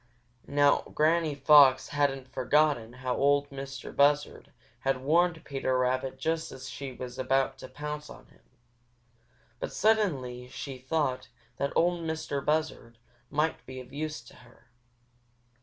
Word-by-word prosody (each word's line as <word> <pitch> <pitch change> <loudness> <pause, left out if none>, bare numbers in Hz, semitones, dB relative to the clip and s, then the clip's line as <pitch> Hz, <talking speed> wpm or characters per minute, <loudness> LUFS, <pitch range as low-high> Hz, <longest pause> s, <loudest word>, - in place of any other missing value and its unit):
Now 145 0 +4
Granny 155 0 +2
Fox 140 -2 +6
hadn't 135 -2 0
forgotten 130 -2 +1
how 125 - 0
Ol' 140 0 +3
Mistah 135 0 -7
Buzzard 145 +1 +2 0.3
had 135 +1 0
warned 165 +2 +2
Peter 135 -2 -1
Rabbit 130 +1 0
just 160 +4 -2
as 130 0 -9
she 135 +1 -6
was 125 0 -8
about 135 +1 +1
to - - -8
pounce 150 +3 -6
on - - -12
him, - - -24 1.2
but - - -3
she - - -11
suddenly 140 - +1
thought 130 0 -3 0.3
that 140 - -1
Ol' 175 0 +2
Mistah 160 -3 -3
Buzzard 150 -6 -2 0.3
might 150 +2 -1
be 130 0 -7
of 125 +1 -12
use 155 -3 -4
to 120 - -16
her. 120 -1 -21
140 Hz, 140 wpm, -29 LUFS, 130-150 Hz, 1.2 s, Fox